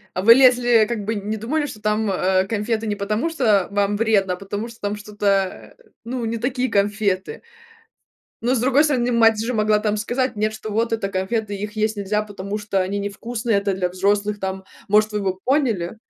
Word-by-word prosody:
А 185 - -1
вы 230 +4 +9
лезли, 245 -3 +5
как 230 -3 -3
бы 220 +3 -2
не 210 +1 -3
думали, 290 +8 -1
что 215 -7 -8
там, 215 0 0
а, 185 0 +1
конфеты 220 +2 -2
не 205 - -1
потому, 210 +9 -1
что 220 - +2
вам 205 0 0
вредно, 205 -4 +2
а - - -3
потому 205 +4 -5
что 230 - -14
там 205 0 -2
что-то, 200 -2 -2 0.3
ну, 245 0 -4
не 230 +1 -2
такие 250 +2 -1
конфеты. 200 -2 0 1.0
Но, 250 +3 +1
с 225 - 0
другой 265 +3 +4
стороны, 250 -5 +1
мать 225 -2 +4
же 245 +2 -2
могла, 215 -1 +2
там, 210 0 -1
сказать 245 +4 -1
нет, 215 +1 -1
что 215 -1 -7
вот 230 +2 0
это 220 -3 -1
конфеты, 205 +3 -2
их 210 +2 -6
есть 215 0 0
нельзя, 205 +1 -1
потому 205 0 -5
что 205 -2 -1
они 195 +2 -2
невкусные, 220 +2 -2
это 200 0 -1
для 185 -1 -1
взрослых, 200 +3 0
там, 190 0 -4 0.2
может, 215 +1 +3
вы 210 - -1
бы 190 -2 -2
поняли. 230 - 0
210 Hz, 200 wpm, -21 LUFS, 200-230 Hz, 1.0 s, вы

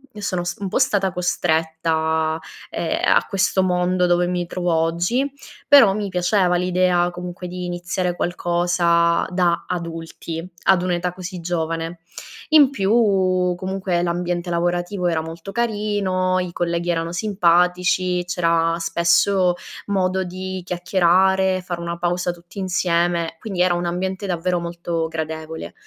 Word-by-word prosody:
io 210 - -8
sono 185 -3 -2
s 175 - -4
un 195 - -3
po' - - 0
stata 205 -8 +2
costretta, 160 -2 0 0.3
ehm, - - -2 0.2
a - - +3
questo 190 -1 +1
mondo 180 0 +1
dove 175 0 +2
mi 180 -1 -1
trovo 175 0 -2
oggi, 170 +12 +1 0.4
però 250 -9 +7
mi 205 -1 -3
piaceva 180 0 +2
l'idea 180 0 +2
comunque 180 0 -7
di 180 0 -5
iniziare 175 +1 -5 0.2
qualcosa 175 -1 +1
da 180 -2 +1
adulti, 165 -1 -5 0.2
ad 190 -2 +4
un'età 180 0 -1
così 185 0 -7
giovane. 165 0 -3 0.5
In 300 -4 +7
più, 195 -6 +2
comunque 185 -1 -2
l'ambiente 175 0 -2
lavorativo 175 +2 -1
era 165 -2 +1
molto 165 +4 -8
carino, 205 -5 0
i 180 -1 -3
colleghi 170 0 -1
erano 165 -1 -1
simpatici, 180 -1 +2
c'era 165 -2 +1
spesso 175 +2 +2 0.3
modo 190 -1 0
di 185 +1 -5
chiacchierare, 185 +1 +2
fare 175 -1 -5
una 170 0 -4
pausa 175 +1 -1
tutti 175 +3 -12
insieme, 175 -2 0
quindi 195 -5 -3
era 180 -1 +4
un 175 0 -2
ambiente 190 +3 -3
davvero 180 0 -1
molto 170 -1 -3
gradevole. 160 0 -5
180 Hz, 135 wpm, -21 LUFS, 170-185 Hz, 0.5 s, però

